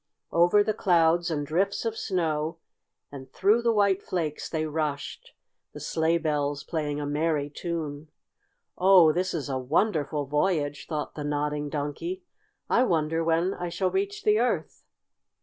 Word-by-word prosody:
Over 175 +5 +4
the 215 - 0
clouds 175 -4 +3
and 145 -3 -2
drifts 195 +9 0
of 225 -1 -1
snow, 165 -6 -1 0.5
and 135 -2 -10
through 210 +5 +3
the 235 0 +2
white 200 -3 +2
flakes 160 -6 -3
they 155 -1 -1
rushed, 150 -2 -4 0.4
the - - -8
sleigh 160 +1 +1
bells 145 -3 -1
playing 150 -3 -3
a 145 - -3
merry 145 0 -1
tune. 155 -2 -5 0.7
"Oh, 185 -4 +7
this 180 +3 -1
is 150 -4 -3
a 135 -2 -2
wonderful 150 - 0
voyage!" 145 -2 -1
thought 150 -2 -4
the 150 - -6
Nodding 145 0 -2
Donkey. 155 - -4 0.4
"I 240 - +3
wonder 165 -5 +1
when 165 +3 +1
I 175 - -4
shall 185 +2 -1
reach 400 +2 -2
the 425 0 +4
Earth?" - - -1
160 Hz, 150 wpm, -27 LUFS, 150-185 Hz, 0.7 s, Oh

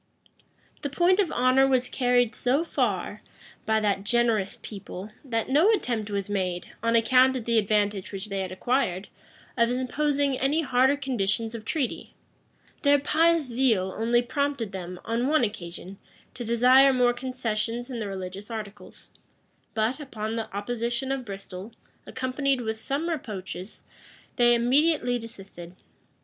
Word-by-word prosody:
[] - - -35
The 285 - -3
point 350 +7 +3
of 375 -6 +2
honor 255 +2 +4
was 255 -2 +2
carried 245 -2 +2
so 265 +6 +1
far 210 - -1 0.5
by 220 0 +3
that 200 -2 0
generous 225 -3 +1
people, 200 0 -8
that 230 -5 -2
no 300 +10 +4
attempt 235 - -1
was 200 -2 -2
made, 185 -3 -2
on 230 +1 +1
account 255 +3 +5
of 245 -4 -4
the 230 -1 +3
advantage 205 -2 0
which 195 +1 -5
they 195 -1 -2
had 190 -1 -3
acquired, 190 -2 -1 0.5
of 235 -1 +3
imposing 275 +2 0
any 290 +5 +2
harder 260 +1 +3
conditions 225 -5 -1
of 225 -2 -7
treaty: 275 0 -3 0.7
their 285 0 +5
pious 325 +3 +3
zeal 230 -7 +1
only 235 +2 +2
prompted 275 -4 -2
them, 180 -1 -7
on 235 +3 0
one 310 -2 +3
occasion, 190 -2 -5 0.3
to 245 - -6
desire 250 +4 +6
more 250 -2 +3
concessions 245 -1 -3
in 240 - -4
the 215 - -3
religious 190 +1 -6
articles; 215 -3 -9 0.6
but, 225 +6 0
upon 220 -6 -5
the 225 -1 -4
opposition 235 +5 -2
of 270 -2 -2
Bristol, 195 0 -8 0.3
accompanied 260 0 -1
with 220 -1 -3
some 280 +8 -2
reproaches, 205 - -6 0.5
they 240 -1 +5
immediately 250 +1 +2
desisted. 190 -6 -11
235 Hz, 145 wpm, -26 LUFS, 205-265 Hz, 0.7 s, desire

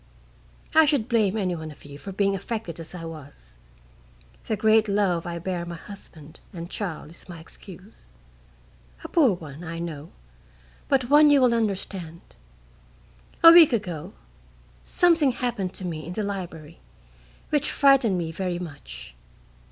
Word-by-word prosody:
I 315 0 +6
should 275 -7 +1
blame 220 -4 +2
any 185 -4 -1
one 160 -1 -7
of 150 - -14
you 145 0 -11
for 195 - -7
being 195 +1 +1
affected 195 -4 -5
as 165 +2 -9
I 165 -2 -7
was. 145 - -12 0.9
The 220 - -1
great 220 +1 +4
love 195 -5 0
I 170 0 -4
bear 175 0 -3
my 170 0 -6
husband 165 -4 -12
and 170 -2 -8
child 170 -6 -5
is 170 - -15
my 170 -2 -8
excuse 185 - -13 0.9
a - - -5
poor 285 - +4
one, 155 -2 -9
I 165 0 -6
know, 165 -2 -6 0.8
but 260 -1 +1
one 300 +1 +7
you 290 -1 +6
will 250 -2 +4
understand. 195 -6 -3 1.2
A 330 - +12
week 335 -5 +8
ago 180 -9 -3 0.7
something 330 -7 +3
happened 210 -7 -3
to 185 - -5
me 160 -3 -5
in 175 - -5
the 215 - -2
library 170 -6 -6 0.7
which 295 -1 +1
frightened 270 -8 +4
me 165 -2 -3
very 180 +1 -3
much. 60 - -9
185 Hz, 150 wpm, -25 LUFS, 165-225 Hz, 1.2 s, A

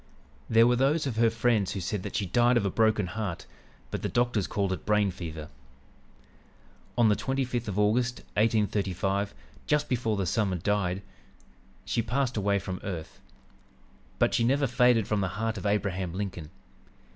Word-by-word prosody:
"There 115 +1 +6
were 125 +1 +4
those 145 +5 +2
of 125 -5 -3
her 115 0 +5
friends 115 -3 +1
who 100 - -3
said 95 +2 -3
that - - -6
she 100 - 0
died 120 +6 +3
of 100 - +1
a 100 - 0
broken 110 -2 +2
heart, 100 -2 -4 0.5
but - - -3
the - - -2
doctors 120 -5 +1
called 100 -2 -1
it 95 - -6
'brain 105 -2 +2
fever.' 80 -4 -7 1.5
"On 120 -2 +5
the 105 - +4
25th 125 -2 -2
of 100 -1 -3
August, 120 +4 +1
1835, 100 -3 0 0.3
just 150 -1 +2
before 115 -4 0
the 95 - 0
summer 95 0 0
died, 95 +1 -1 0.8
she 115 - 0
passed 125 +3 -1
away 100 -1 +1
from 95 -1 -5
earth. 85 -5 -6 1.0
But - - +2
she 115 - +2
never 140 +4 +2
faded 125 -3 +3
from 105 -2 0
the 95 - 0
heart 110 -1 -1
of 105 - -3
Abraham 95 -4 -1
Lincoln. 95 -6 -5
105 Hz, 170 wpm, -28 LUFS, 95-120 Hz, 1.5 s, There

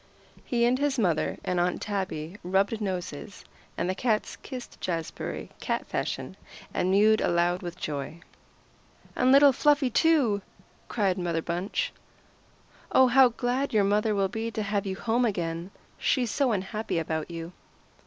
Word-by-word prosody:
He 235 -1 +1
and 250 +2 +2
his 285 -1 +1
mother 175 -9 +1
and 180 -1 0
Aunt 175 0 +1
Tabby 190 -5 -3
rubbed 195 +5 +1
noses, 185 -1 -5 0.3
and 170 - -1
the 185 - 0
cats 215 +1 0
kissed 255 -3 -9
Jazbury, 165 -3 -4
cat - - -2
fashion, - - -3 0.4
and 180 - 0
mewed 215 +3 +4
aloud 175 +1 +1
with 175 -1 -6
joy. 150 +1 -5 0.9
"And 255 0 +3
little 280 0 +7
Fluffy, 285 -1 +3
too!" 255 -8 +3 0.5
cried 195 -5 0
Mother 170 -2 -1
Bunch. 185 - -2 1.0
"Oh, 260 - +6
how 260 +1 +7
glad 245 +2 -1
your 210 - +5
mother 210 +2 +2
will 195 -1 +2
be 220 +3 -3
to 220 -1 -3
have 200 0 -1
you 190 - -2
home 235 +5 0
again. 175 -5 -2 0.3
She's 245 -5 +1
so 275 -4 +2
unhappy 210 0 -2
about 160 0 -2
you." 165 +1 -7
200 Hz, 150 wpm, -27 LUFS, 175-240 Hz, 1.0 s, little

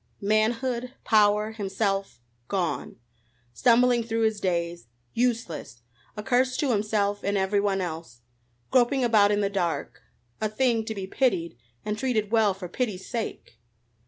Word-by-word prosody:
Manhood, 235 +4 0
power, 210 0 +3
himself 195 - -2 0.3
gone. 175 -9 -2 0.6
Stumbling 245 - +4
through 225 0 -2
his 220 -1 +1
days! 170 -6 -2 0.3
Useless! 225 - -2 0.3
a 210 - -4
curse 255 +1 +2
to 280 -4 +1
himself 205 -1 0
and 200 0 0
everyone 195 0 +1
else. 160 -8 -6 0.5
Groping 260 +1 +3
about 215 -4 +4
in 205 0 +1
the 200 - +2
dark 175 -4 -2 0.4
a 215 - +1
thing 230 0 +1
to 220 -1 -4
be 195 -2 -4
pitied 190 - 0 0.3
and 210 0 -2
treated 220 -6 0
well 220 -4 +3
for 190 -2 -7
pity's 195 -1 -3
sake! 225 - -5
210 Hz, 135 wpm, -26 LUFS, 195-235 Hz, 0.6 s, Stumbling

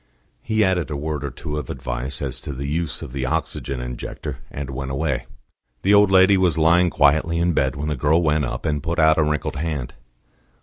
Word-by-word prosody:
He 110 - +1
added 95 -3 +1
a 75 - -3
word 75 -1 -3
or 70 - -2
two 75 +3 -5
of 70 - -8
advice 65 +2 -4
as - - -3
to 70 - -6
the 70 +2 -5
use 75 -1 -2
of - - -9
the 65 -2 -2
oxygen 70 +1 -2
injector, 60 0 -6
and 70 -1 -6
went 65 0 -4
away. 65 0 -2 0.6
The 100 - +4
old 105 -1 +6
lady 95 +1 +6
was 90 -4 +2
lying 85 +3 +4
quietly 80 +3 +3
in 85 +1 +2
bed, 65 -3 +1
when 75 +2 -3
the 75 - -1
girl 75 +6 +2
went 75 -1 +2
up, 65 - -4
and 75 -1 0
put 85 +2 -3
out 80 0 +5
a - - +4
wrinkled 75 0 -1
hand. 75 -5 -3
75 Hz, 215 wpm, -22 LUFS, 70-85 Hz, 0.6 s, old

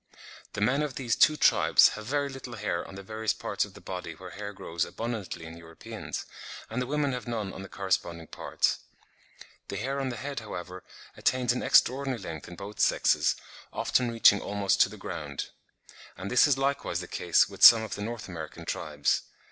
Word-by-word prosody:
The - - -4
men 125 +7 +2
of 150 -4 -3
these 120 -4 0
two 155 - +5
tribes - - +6
have 110 0 -8
very 145 +2 0
little 135 -3 -8
hair 100 -5 -2
on - - -11
the 100 - -8
various 110 +1 -1
parts - - -2
of - - -16
the - - -12
body 90 -3 -6
where 90 +2 -10
hair 100 +4 -6
grows 85 -4 -3
abundantly 110 -8 -5
in 80 +1 -9
Europeans, 80 0 -7 0.5
and 120 +3 -1
the 125 - -2
women 145 0 0
have 125 -1 -5
none 110 -5 -3
on - - -8
the 95 - -9
corresponding 85 -4 -2
parts. - - -1 0.9
The - - -5
hair 135 +5 -2
on 135 - -1
the 125 - -4
head, 140 +2 -4
however, 90 -3 -7 0.3
attains 125 -2 +1
an 125 - -3
extraordinary 130 -1 +3
length 85 -5 -7
in 90 - -9
both 100 +4 -9
sexes, - - +3 0.4
often 125 -2 +1
reaching 115 -3 +5
almost 100 -1 +1
to - - +5
the - - -10
ground; 70 -2 -5 0.7
and 95 +3 -6
this 125 +4 +6
is 140 -2 +3
likewise 135 -10 -1
the 90 - -6
case 85 0 +3
with - - -12
some 115 -1 +10
of 110 - -5
the 105 - -5
N. 115 +3 -3
American 80 -4 -8
tribes. 75 -1 0
105 Hz, 195 wpm, -28 LUFS, 90-125 Hz, 0.9 s, some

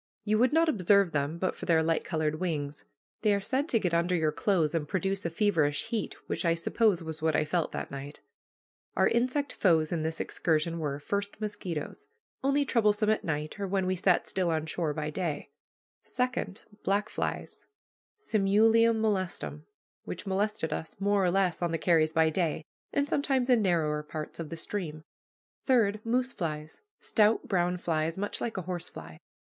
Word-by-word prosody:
You 215 0 +2
would 255 +3 +4
not 325 +2 +4
observe 200 - +3
them 145 +2 -1
but 185 +2 -1
for - - -8
their 160 -2 +4
light 165 0 +1
colored 155 -2 -1
wings. 150 -5 -3 0.4
They 210 -2 +3
are - - 0
said 265 +10 -1
to 230 - +3
get 180 -5 -1
under 170 +2 +2
your 160 -3 +2
clothes 170 -4 +1
and 160 -3 -1
produce 195 +1 -1
a - - -2
feverish 165 -6 +1
heat, 225 -2 -2
which - - -2
I 165 -1 +3
suppose 185 +1 +2
was 160 -1 -6
what 160 -1 +2
I 155 - +2
felt 165 +1 0
that - - -4
night. 140 +1 -7 0.8
Our - - +4
insect 255 +4 0
foes 160 -5 +3
in 170 -2 0
this 160 +1 -2
excursion 165 0 0
were, 145 -3 -2
first, 200 +7 -3
mosquitoes, 205 - -5 0.4
only 280 +1 +2
troublesome 215 -4 +2
at 215 - 0
night, 155 +3 -3
or 200 - -2
when 190 0 0
we 185 0 +1
sat 185 0 +2
still 185 -2 -1
on 160 -1 0
shore 160 0 -1
by 150 0 -3
day; 160 -3 -3 0.5
second, 250 -6 -2 0.2
black 200 +1 +1
flies - - -4 0.5
(simulium 225 - +4
molestum), 185 -7 -2 0.4
which - - -6
molested 200 -2 -1
us 160 - -5
more 200 0 +2
or 180 - +3
less 180 -2 +1
on 170 -1 0
the 165 - 0
carries 160 -2 +3
by 160 -1 +4
day, 160 -2 -1 0.3
and 285 0 +1
sometimes 270 -3 +1
in 240 -3 +5
narrower 160 -6 +1
parts 150 +1 -7
of 165 -2 -5
the 165 - -6
stream; 160 -4 -4 0.6
third, 215 -5 +3
moose 245 +2 0
flies, 155 -3 -5 0.2
stout 215 0 +2
brown 180 -2 +1
flies 165 -1 -1
much 205 +1 -3
like 230 - -3
a 185 - -2
horsefly. 175 - -6
180 Hz, 180 wpm, -29 LUFS, 160-210 Hz, 0.8 s, in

